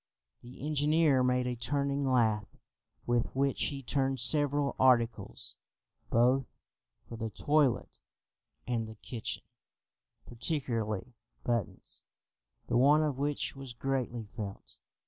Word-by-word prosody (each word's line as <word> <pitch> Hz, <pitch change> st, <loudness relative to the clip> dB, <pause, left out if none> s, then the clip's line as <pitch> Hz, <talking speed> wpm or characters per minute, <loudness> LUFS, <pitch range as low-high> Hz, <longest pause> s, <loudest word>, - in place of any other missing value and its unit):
The 125 Hz, +3 st, -9 dB
engineer 150 Hz, -1 st, +3 dB
made 125 Hz, 0 st, +2 dB
a 125 Hz, 0 st, -1 dB
turning 140 Hz, +2 st, 0 dB
lathe, 110 Hz, -4 st, +2 dB, 0.5 s
with 120 Hz, -1 st, +2 dB
which 135 Hz, 0 st, +2 dB
he 140 Hz, -2 st, -2 dB
turned 135 Hz, +1 st, +1 dB
several 145 Hz, +3 st, +2 dB
articles 120 Hz, -3 st, +2 dB, 0.5 s
both 125 Hz, +3 st, +3 dB, 0.6 s
for 115 Hz, -, -7 dB
the 110 Hz, 0 st, -3 dB
toilet 145 Hz, +3 st, +1 dB, 0.7 s
and 115 Hz, -2 st, -1 dB
the 110 Hz, -, -9 dB
kitchen, 110 Hz, +1 st, -5 dB, 0.8 s
particularly 120 Hz, -, -2 dB, 0.3 s
buttons, 115 Hz, -5 st, -2 dB, 0.6 s
the 120 Hz, -, +1 dB
want 145 Hz, +5 st, +6 dB
of 145 Hz, -4 st, -1 dB
which 145 Hz, 0 st, 0 dB
was 135 Hz, -2 st, -7 dB
greatly 125 Hz, -3 st, -2 dB
felt. 100 Hz, -4 st, -7 dB
125 Hz, 110 wpm, -31 LUFS, 115-140 Hz, 0.8 s, want